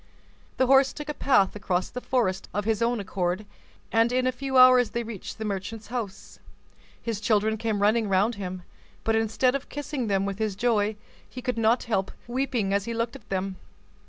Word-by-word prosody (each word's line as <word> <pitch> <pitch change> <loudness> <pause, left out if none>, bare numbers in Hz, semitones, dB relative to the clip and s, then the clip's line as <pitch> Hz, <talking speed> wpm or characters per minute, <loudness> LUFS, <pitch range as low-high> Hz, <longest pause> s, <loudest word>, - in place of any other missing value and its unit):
The 260 - +4
horse 270 0 +5
took 300 0 -7
a - - -1
path 210 -10 +3
across 185 -3 -1
the 250 - -5
forest 230 -9 0
of 205 0 -1
his 220 0 0
own 235 0 +1
accord, 185 0 -2 0.5
and 225 +1 +3
in 255 0 +1
a 255 - +3
few 265 +1 -2
hours 255 -2 +7
they 235 - -2
reached 220 -4 -7
the 220 - -4
merchant's 205 +2 -5
house. 215 -6 -5 0.6
His 225 -3 -4
children 220 -1 +2
came 220 -2 -1
running 215 0 +3
round 195 +5 +3
him, 185 -3 -6 0.4
but, 225 - +1
instead 225 +3 +2
of 275 0 -4
kissing 285 -4 -4
them 195 -1 +1
with 200 0 -2
joy, 215 -2 +1 0.3
he 250 - -8
could 250 -3 -1
not 225 +2 +3
help 195 -4 -1 0.2
weeping 245 -5 -1
as 200 0 +1
he 230 - -3
looked 230 +1 -2
at 215 - -13
them. 190 0 -2
225 Hz, 190 wpm, -26 LUFS, 200-245 Hz, 0.6 s, hours